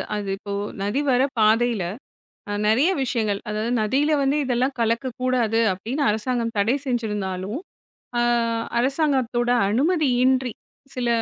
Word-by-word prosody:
அது 205 -1 -3
இப்போத 200 0 -4 0.2
நதி 210 +8 0
வர 250 0 +3 0.2
பாதையில 220 -1 +3 0.7
அ - - -2
நிறைய 260 - +4
விஷயங்கள், 215 -5 -1
அதாவது 215 +3 -2
நதியில 275 +8 +1
வந்து 275 +2 +2
இதெல்லாம் 255 +2 0
கலக்கக்கூடாது 235 0 0
அப்பிடின்னு 235 +10 -3
அரசாங்கம் 230 +1 -1
தடை 220 +6 +2
செஞ்சிருந்தாலும், 210 - -2 0.6
ஆ - - +3 0.6
அரசாங்கத்தோட 260 -3 +1 0.2
அனுமதியின்றி 260 - +2 0.4
சில 245 -1 -1
240 Hz, 110 wpm, -23 LUFS, 215-260 Hz, 0.7 s, நிறைய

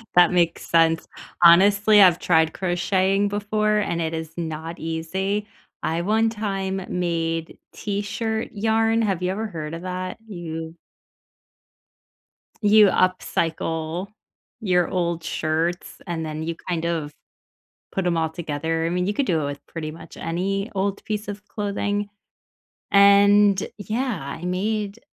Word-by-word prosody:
That 180 0 +6
makes 170 -2 +1
sense. 165 -1 +3 0.4
Honestly, 205 +4 +7
I've 180 -3 +7
tried 160 -2 +3
crocheting 190 +2 +1
before, 210 +1 0
and 170 -5 -1
it 160 0 -2
is 160 -1 -5
not 160 0 -5
easy. 190 +6 -2 0.4
I, 165 +1 0
one 220 +4 +2
time, 195 -3 -3
made 165 -2 -2
T-shirt 220 +2 -3
yarn. 225 +1 +1
Have 190 -4 0
you 180 - 0
ever 220 +3 -3
heard 160 -5 -6
of 170 - -8
that? 185 +1 -4
You 165 -4 -6 1.8
you 210 -1 +6
upcycle 170 -1 0 0.5
your 180 -4 +2
old 170 -2 -1
shirts, 165 +3 -2
and 165 -2 -3
then 155 0 -4
you, 165 +1 -3
kind 170 -2 -1
of, 160 -3 -2 0.8
put 195 -2 -2
'em 170 - +1
all 160 -1 +1
together. 160 0 -2
I - - 0
mean, 180 +1 0
you 205 - 0
could 275 +6 0
do 165 -8 +1
it 145 - -2
with 140 0 -6
pretty 155 -2 -5
much 160 - -12
any 195 +5 -2
old 195 +1 -1
piece 210 0 -3
of 205 0 -7
clothing, 205 0 -2 0.8
and, 200 0 +6 0.2
yeah, 220 0 -2 0.2
I 170 - -9
made 205 +3 -2
185 Hz, 140 wpm, -23 LUFS, 165-205 Hz, 1.8 s, Honestly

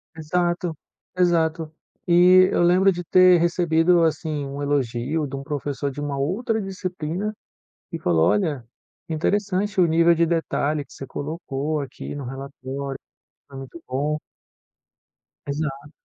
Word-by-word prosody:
Exato, 175 +1 -1 0.4
exato. 165 -3 +1 0.4
E 180 +2 +6
eu - - +2
lembro 185 +3 +5
de 175 -1 -4
ter 180 0 +6
recebido, 170 0 +3
assim, 155 -2 -1
um 140 +1 -6
elogio 145 +1 -1
de 140 -1 -6
um 135 - -6
professor 145 -1 -3
de 140 +2 -7
uma 145 -1 -3
outra 220 - -1
disciplina, 185 0 -4 0.6
que - - -4
falou: 85 -2 +2
"Olha, 155 - 0 0.5
interessante 195 +4 0
o 175 - +5
nível 165 +1 +4
de 170 0 +2
detalhe 155 -3 -1
que - - -18
você 135 - -8
colocou 150 0 -3
aqui 135 -2 -7
no 145 -2 -6
relatório, 135 +1 -6 0.5
né, 135 - -10
muito 135 +5 -10
bom". 145 +4 -1 1.3
Exato. 145 0 -4
160 Hz, 135 wpm, -23 LUFS, 140-175 Hz, 1.3 s, E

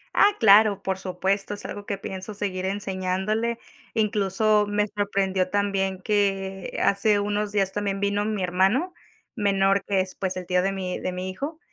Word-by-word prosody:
Ah, 410 0 +6
claro, 205 -1 +6
por 190 0 -2
supuesto, 190 +2 -1
es 205 - -6
algo 205 0 -7
que 200 - -2
pienso 190 +1 -7
seguir 190 -2 -3
enseñándole, 195 +4 -1 0.4
incluso 210 -1 +2
me 205 0 +1
sorprendió 195 -2 0
también 195 -2 0
que 195 -2 -1
hace 205 +1 +3
unos 205 0 -1
días 195 -2 +1
también 200 -1 -2
vino 200 0 0
mi 210 -3 -2
hermano 195 - +1 0.4
menor, 195 -2 +2
que 195 -2 +2
es, 185 0 -4
pues, 185 -1 -3
el 180 - -5
tío 180 0 +2
de 195 +2 0
mi 185 -2 -4
de - - -3
mi 185 +1 -4
hijo 295 - -6
200 Hz, 170 wpm, -25 LUFS, 190-205 Hz, 0.4 s, Ah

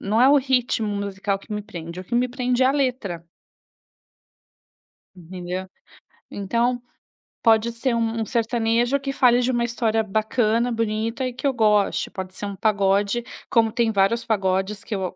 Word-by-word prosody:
não 210 +3 0
é 255 - +7
o 285 - +6
ritmo 255 -4 +1
musical 200 -1 -2
que 195 - -20
me 210 0 -3
prende, 170 -4 -8
o - - -10
que 230 - -5
me 245 +1 +2
prende 250 0 0
é - - +5
a - - +4
letra. 250 - -2 1.9
Entendeu. 180 +1 -6 0.6
Então 235 +5 -1 0.6
pode 225 0 +4
ser 235 +2 -1
um 230 0 -1
um - - -1
sertanejo 235 +3 +1
que 275 0 -3
fale 245 -2 +4
de 250 +1 +1
uma 240 -1 0
história 225 -2 0
bacana, 220 +3 +1
bonita 225 +2 -1
e 255 - -3
que 255 - -8
eu 275 - +3
goste. 210 -3 +2
Pode 185 -1 -7
ser 205 - -5
um 200 - -5
pagode, 200 +2 +1 0.3
como 225 -1 +3
tem 230 -1 +1
vários 210 +3 +2
pagodes 195 -1 0
que 220 - -4
eu 185 -2 -3
225 Hz, 170 wpm, -23 LUFS, 200-240 Hz, 1.9 s, é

